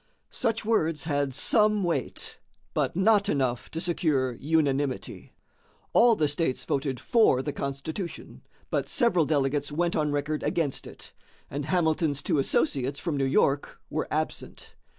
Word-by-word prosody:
Such 225 -3 -1
words 165 -9 +1
had 145 -3 0
some 210 - +3
weight, 165 -8 -3 0.3
but - - 0
not 205 +2 +3
enough 130 -6 -1
to 160 - -5
secure 155 -7 +1
unanimity. 140 0 -1 0.6
All 235 -1 +6
the 155 -6 +1
states 145 -2 -1
voted 135 -2 -1
for 215 - +3
the 145 - -3
Constitution, 145 +6 -5 0.3
but - - -1
several 190 - +2
delegates 145 -1 0
went 170 +3 0
on 150 -1 +1
record 145 +1 -2
against 150 -5 -1
it, - - -13 0.4
and 140 +1 -3
Hamilton's 160 -4 +1
two 150 - +1
associates 140 -1 0
from 165 -5 -2
New 135 -1 +1
York 140 +1 +1
were - - -2
absent. - - -4
150 Hz, 140 wpm, -27 LUFS, 140-175 Hz, 0.6 s, All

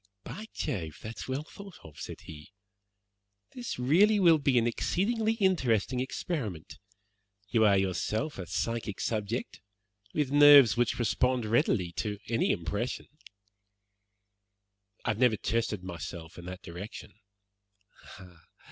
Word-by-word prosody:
"By 205 - -8
Jove, 85 - -3
that's 110 +1 -7
well 130 +3 -2
thought 195 +3 -12
of," 75 -3 -13
said - - -7
he. 75 +3 -12 1.0
"This 245 -2 -5
really 185 +12 +4
will 170 -4 +6
be 140 -3 +2
an 115 - +3
exceedingly 220 - 0
interesting 130 - +1
experiment. 125 - -4 0.7
You 110 -2 +3
are 100 -2 +5
yourself 95 - -1
a 90 - -6
psychic 115 +3 -3
subject 110 +1 -3 0.5
with 145 -3 -1
nerves 145 -7 +8
which 120 -1 +1
respond 125 +1 +1
readily 105 -5 +1
to 105 -1 -2
any 115 0 +1
impression." 100 +8 -2 2.0
"I - - +2
have 110 - -4
never 125 -4 +4
tested 110 -3 -1
myself 85 -2 -7
in 90 - -10
that 90 +1 -8
direction." 90 +4 -9
115 Hz, 120 wpm, -29 LUFS, 100-145 Hz, 2.0 s, nerves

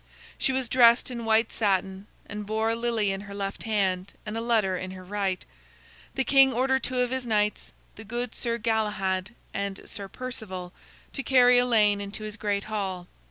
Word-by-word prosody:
She - - +2
was 260 -1 0
dressed 240 0 +5
in 235 -2 -5
white 225 0 +3
satin, 195 -1 0 0.2
and 210 0 -6
bore 220 +1 +1
a - - 0
lily 230 -3 0
in 195 0 -3
her 200 -1 -9
left 200 0 -4
hand 195 -3 0
and 215 0 -5
a 225 - -2
letter 220 -5 +2
in 185 +1 -4
her 185 0 -9
right. 195 -1 -2 0.7
The 265 - +1
king 270 0 +6
ordered 265 +2 +1
two 255 -1 0
of 250 0 0
his 260 -1 -1
knights, 210 -1 0 0.3
the 220 - -8
good 240 +2 -3
Sir 235 -1 -1
Galahad 210 -2 -1 0.2
and 200 -1 -4
Sir 200 -1 -4
Perceval, 195 -6 -7 0.4
to 275 - -2
carry 250 -2 +6
Elaine 215 -5 +3
into 200 +2 -5
his 215 -1 -5
great 205 -3 -1
hall. 195 -4 -3
215 Hz, 185 wpm, -27 LUFS, 200-240 Hz, 0.7 s, king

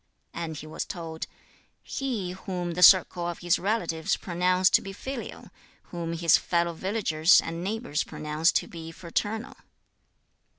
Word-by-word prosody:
And 165 -2 -5
he 150 - -8
was 155 - -4
told, 165 -3 -6 0.6
'He 235 -10 -3
whom 180 -2 -4
the 175 +2 -3
circle 180 -1 +6
of 175 - -4
his 175 0 +1
relatives 175 -6 -1
pronounce 180 +1 +1
to - - +5
be 195 - -7
filial, 260 +5 -7 0.4
whom 170 -1 -4
his 170 -1 +4
fellow 170 -1 0
villagers 180 -3 +3
and 165 +1 -4
neighbours 205 -6 -2
pronounce 155 +2 0
to - - +1
be 165 -1 -8
fraternal.' 205 +8 -4
175 Hz, 140 wpm, -27 LUFS, 165-190 Hz, 0.6 s, circle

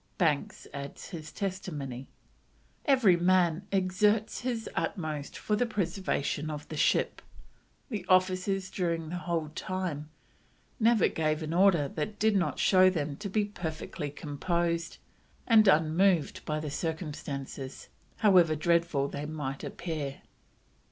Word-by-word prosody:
Banks 155 -6 0
adds 140 0 -7
his 155 -3 -7
testimony: 150 -10 -4 0.8
"Every 255 - +5
man 180 0 +2
exerts 205 +3 +2
his 240 -3 -3
utmost 155 -6 -3
for 210 - 0
the 245 +3 +1
preservation 175 -7 -1
of 150 -1 -6
the 155 - -5
ship. - - +2 0.7
The 210 -7 -3
officers 185 +1 +2
during 165 -3 -1
the 180 - -3
whole 170 -3 -2
time 175 -5 -3 0.7
never 230 -2 +4
gave 155 0 -1
an 155 +1 -3
order 175 -5 +4
that 165 +9 -4
did 220 0 +3
not 185 -2 +1
show 185 -1 +6
them 150 -5 -2
to 200 +2 -5
be 210 +2 +1
perfectly 160 -5 -5
composed 170 +4 -2 0.5
and 220 -3 +6
unmoved 165 0 +3
by 155 0 -1
the 150 -2 -4
circumstances, 145 -4 -5 0.3
however 180 -7 +5
dreadful 165 -3 +2
they 145 +1 -5
might 145 -3 -4
appear." 155 -5 -5
170 Hz, 125 wpm, -29 LUFS, 150-190 Hz, 0.8 s, show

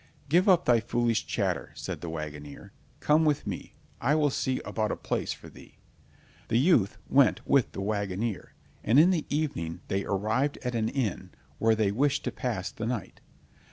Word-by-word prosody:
"Give 180 +7 +4
up 180 -2 +5
thy 120 -2 +5
foolish 115 0 0
chatter," - - -1
said - - -5
the 85 - -5
wagoner. 75 -2 -7 0.3
"Come 150 +2 +4
go 160 - +3
with 150 -2 +1
me, - - -6 0.3
I 140 +5 +3
will 150 -2 +2
see 130 0 -1
about 110 -1 -1
a - - -1
place - - -2
for - - -8
thee." - - -15 0.7
The 115 - +2
youth 125 - +3
went 140 -1 +3
with 140 -3 +3
the - - -4
wagoner, 100 +1 -3 0.3
and 120 +6 +5
in 175 +4 +6
the 165 -5 -1
evening 140 - -2
they 95 +1 0
arrived 110 +9 0
at 125 -1 -2
an 110 -1 0
inn 110 -8 -2 0.3
where 110 0 +4
they 105 -2 +1
wished 140 +6 +1
to - - -2
pass 110 -7 -3
the 110 - -5
night. 120 -3 -4
115 Hz, 185 wpm, -28 LUFS, 100-140 Hz, 0.7 s, in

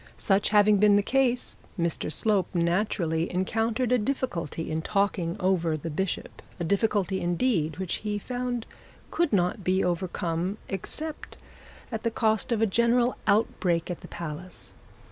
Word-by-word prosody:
Such 195 0 +2
having 210 0 +5
been 205 0 +5
the 205 - +4
case, 250 0 +1 0.2
Mr 170 -2 -1
Slope, 200 0 +2
naturally 170 -2 +1
encountered 225 +6 0
a 250 - +4
difficulty 180 - -2
in 160 +1 -1
talking 195 -3 0
over 175 -4 +1
the 165 +2 -5
bishop, 190 +4 -3 0.2
a - - -1
difficulty 200 +1 +1
indeed 175 -2 +1
which 185 -2 -2
he 210 -1 -3
found 245 +1 -3 0.5
could 340 -3 +1
not 180 -1 +1
be 185 +2 +2
overcome 175 +1 -1
except 300 - -5 0.5
at 220 -1 -3
the 230 - +1
cost 220 0 0
of 225 -1 +2
a - - +6
general 235 +4 +2
outbreak 190 -5 +2
at 175 - -6
the - - -10
palace. 170 +2 -7
195 Hz, 145 wpm, -27 LUFS, 175-225 Hz, 0.5 s, a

